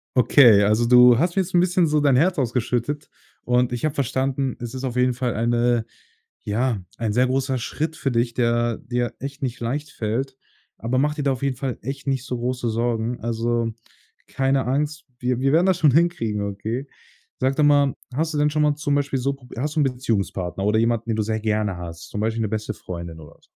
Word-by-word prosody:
Okay, 120 -4 +6
also 105 +3 +2
du 125 0 +7
hast 170 +3 +1
mir 195 - +3
jetzt 185 - -10
'n 175 - +5
bisschen 180 0 +3
so 150 0 +2
dein 145 -3 +3
Herz 170 +5 +2
ausgeschüttet 125 +3 -1 0.3
und 125 0 +2
ich 120 +3 -2
habe 155 - 0
verstanden, 135 -1 -1
es 120 -1 -6
ist 130 0 -6
auf 125 -2 -3
jeden 125 0 +2
Fall 125 0 -2
eine 120 0 +1 0.6
ja, 110 -1 -1
ein 110 -3 -1
sehr 125 +3 +3
großer 130 0 0
Schritt 155 +6 -3
für 135 - -2
dich, 120 0 0
der 120 -1 +1
dir 120 -1 -3
echt 140 +1 -7
nicht 125 -2 -3
leicht 145 +6 -3
fällt. 130 +5 -3 0.4
Aber 120 +3 -2
mach 150 +3 +2
dir 150 - -3
da 135 -1 +2
auf 130 - -7
jeden 135 -2 -1
Fall 130 -4 -3
echt 135 +4 -6
nicht 135 -2 0
so 125 - -3
große 125 0 -2
Sorgen. 115 +1 -1
Also, 115 0 -1 0.5
keine 135 0 0
Angst, 145 +4 -1
wir 125 -1 -1
wir 135 +1 +2
werden 165 +4 +4
das 190 -2 +3
schon 150 -3 +5
hinkriegen, 135 -10 +1
okay? 110 +7 -4 0.5
Sag 130 +1 +1
doch 155 - +3
mal, 145 -2 +4 0.2
hast 160 +4 -1
du - - -1
denn 150 0 +3
schon 150 +1 0
mal 150 -1 +3
zum 145 -1 -1
Beispiel 140 -1 0
so 135 +2 0
pro 135 -2 -15
hast 150 +5 -2
du - - +1
'n - - +4
Beziehungspartner 100 - -2
oder 105 +2 +2
jemanden, 115 0 0
den 110 - +1
du 110 - +1
sehr 110 +1 -2
gerne 105 -2 0
hast, 85 -1 -8
zum 105 - -4
Beispiel 110 +1 -1
'ne 110 - 0
beste 110 0 -3
Freundin 85 -2 -8
oder 75 -2 -14
so? - - -27
125 Hz, 220 wpm, -23 LUFS, 115-140 Hz, 0.6 s, du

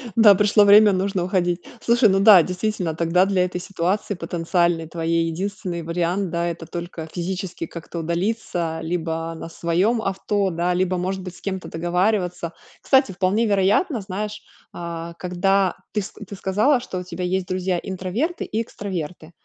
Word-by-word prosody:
Да, 215 -3 +8
пришло 210 +1 +4
время, 205 +1 +8
нужно 190 -1 0
уходить. 175 -1 0 0.2
Слушай, 235 0 +4
ну 195 0 +3
да, 195 -4 +8
действительно, 180 -2 -2
тогда 170 +3 +3
для 190 -2 +2
этой 180 0 -4
ситуации 195 +3 -1
потенциальной 170 -1 0
твоей 165 0 0
единственный 185 +1 -4
вариант, 175 +3 -1
да, 170 0 -1
это 170 -1 -5
только 170 -2 -6
физически 180 -1 -4
как-то 170 +1 -7
удалиться 170 -1 -2
либо 165 -1 -2
на 165 - -8
своём 180 +8 +1
авто, 195 +1 0
да, 175 +1 0
либо 185 0 +1
может 190 +2 -2
быть 180 -1 -8
с - - -16
кем-то 190 -2 -4
договариваться. 180 0 -1 0.3
Кстати, 265 -6 +3
вполне 190 +5 +1
вероятно, 210 - +2
знаешь, 210 +2 -5 0.3
а, 170 -1 -6
когда 185 +2 +1 0.2
ты 210 - +1
с 195 - -7
ты 205 -1 -10
сказала, 210 +9 +2
что 190 -6 -5
у - - -5
тебя 180 0 -6
есть 185 0 -1
друзья 185 -1 -1
интроверты 195 - -3
и 220 - -2
экстраверты, 180 -7 -6
185 Hz, 160 wpm, -22 LUFS, 170-200 Hz, 0.3 s, Да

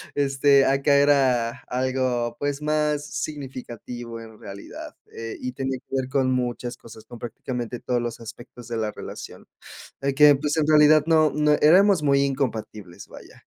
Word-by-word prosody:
este, 140 0 +3
acá 140 +1 +2
era 135 -5 +3 0.2
algo, 125 -2 -1
pues, 145 0 -3
más 150 -1 0
significativo 125 -5 -7
en 110 -1 -13
realidad, 100 -2 -10 0.2
eh, 115 0 -7
y 125 - -4
tenía 135 0 -3
que 135 - -8
ver 130 -1 -2
con 130 -1 +1
muchas 125 -1 -3
cosas, 110 -2 -14
con 120 +1 -12
prácticamente 120 +1 -5
todos 120 0 -1
los 120 -1 -5
aspectos 120 +1 -11
de 115 - -4
la 110 -1 -2
relación. - - -10 0.5
De 140 0 -1
que, 145 +1 +7
pues, 145 +1 -2
en 155 -2 +1
realidad 155 0 +6
no 155 -2 +4
no 150 0 +2
éramos 185 +2 +5
muy 140 -1 +3
incompatibles, 115 -9 -4
vaya. - - -15
130 Hz, 160 wpm, -24 LUFS, 120-145 Hz, 0.5 s, que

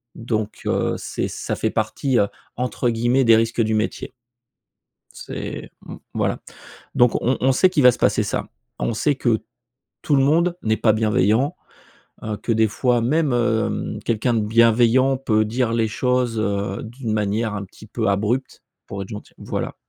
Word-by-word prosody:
Donc, 110 -2 -3
heu, - - 0
c'est - - -3
ça - - -4
fait 110 - -1
partie, 120 +4 0
heu, 100 - +3 0.3
entre 125 0 -1
guillemets 120 +3 +2
«des 115 -2 +6
risques 115 +1 +1
du 110 0 +1
métier». 110 0 -2 1.0
C'est - - -7
mmh, - - -8 0.2
voilà. - - -1 0.6
Donc 125 -1 +5
on 130 +2 +1
on 135 - +4
sait 185 +8 +4
qu'il 175 -6 +1
va 125 - +9
se - - -7
passer - - +2
ça. - - -3 0.3
On - - -1
sait 145 +6 +1
que 120 -4 +1 0.6
tout 145 - +2
le 135 - +4
monde 170 +5 +2
n'est 110 0 +1
pas 110 -1 +3
bienveillant, 110 +4 +2 0.7
heu, 110 -1 -3
que 115 - -1
des 110 0 +3
fois, 120 +3 +1
même, 145 +4 +1
hem, 120 -2 0
quelqu'un 115 +2 0
de 115 - +2
bienveillant 115 +4 +4
peut 110 -5 +1
dire 115 +2 -1
les 115 -1 +1
choses, 125 0 0
heu, 100 -1 -2
d'une 115 0 -5
manière 105 +1 -1
un 100 -1 -4
petit 100 +2 -15
peu 110 0 -2
abrupte, 105 +7 -1 0.2
pour 100 0 -5
être 95 - -9
gentil 105 -2 -9
voilà. - - -4
115 Hz, 175 wpm, -21 LUFS, 110-125 Hz, 1.0 s, va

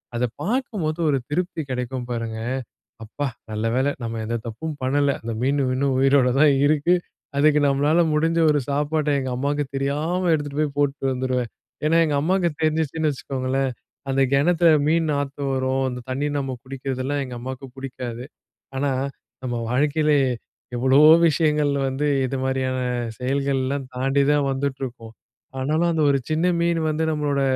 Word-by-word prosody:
அத 120 +1 +1 0.2
பாக்கும்போது 200 -8 -2
ஒரு 140 - +2
திருப்தி 175 +1 -2
கிடைக்கும் 125 0 -3
பாருங்க, 115 -2 -3 0.7
"அப்பா 140 +6 -4 0.2
நல்ல 110 +1 -2
வேலை 135 +3 +2
நம்ப 115 0 -3
எந்த 115 +1 -1
தப்பும் 135 +8 -5
பண்ணல. 140 +2 +2
அந்த 115 +1 -4
மீன் 140 +3 +1
மீன் 130 +2 0
உயிரோடு 135 -1 +4
தான் 150 0 +6
இருக்கு.' 155 +4 +3 0.4
அதுக்கு 150 0 +5
நம்பளால 145 +4 +3
முடிஞ்ச 165 +2 +2
ஒரு 150 - +2
சாப்பாட்ட, 150 +2 0
எங்க 130 -1 -3
அம்மாவுக்கு 145 +3 -1
தெரியாம 150 +6 -1
எடுத்துகிட்டு 145 -1 -2
போய் 145 -2 -1
போட்டுட்டு 140 -1 0
வந்துருவேன்." 125 -2 -1 0.4
ஏன்னா, 160 +2 +3
எங்க 150 -2 0
அம்மாவுக்கு 175 +2 +1
தெரிஞ்சிச்சுன்னு 155 0 +1
வச்சுக்கோங்களேன், 135 0 -2 0.4
அந்த 135 0 +2
கிணத்துல 165 +3 +4 0.2
மீன் 160 0 +2
நாத்தம் 140 -1 -2
வரும், 130 0 0
அந்த 125 0 -6
தண்ணீ 145 +3 -1
நம்ப 135 -2 -3
குடிக்குறதெல்லாம் 135 +1 -3
எங்க 125 -1 -7
அம்மாவுக்கு 130 +1 -7
பிடிக்காது. 125 -2 -6 0.5
ஆனா, 140 +1 0 0.5
நம்ப 125 -2 -2 0.2
வாழ்க்கையில 150 +3 +2 0.6
எவ்வளவோ 135 +5 +6 0.2
விஷயங்கள் 150 -2 +2 0.2
வந்து 135 +3 -1 0.2
இது 135 - -3
மாதிரியான 130 -1 -1 0.4
செயல்கள்லாம் 135 0 -1
தாண்டி 135 +2 +2
தான் 145 -1 +2
வந்துட்ருக்கும். 130 -4 -4 0.5
ஆனாலும், 155 +6 +1
அந்த 160 -1 0
ஒரு 140 -1 +3
சின்ன 160 +3 +1
மீன் 170 0 +1
வந்து 155 +1 -1
நம்பளோட 145 -2 0
140 Hz, 145 wpm, -23 LUFS, 130-150 Hz, 0.7 s, தான்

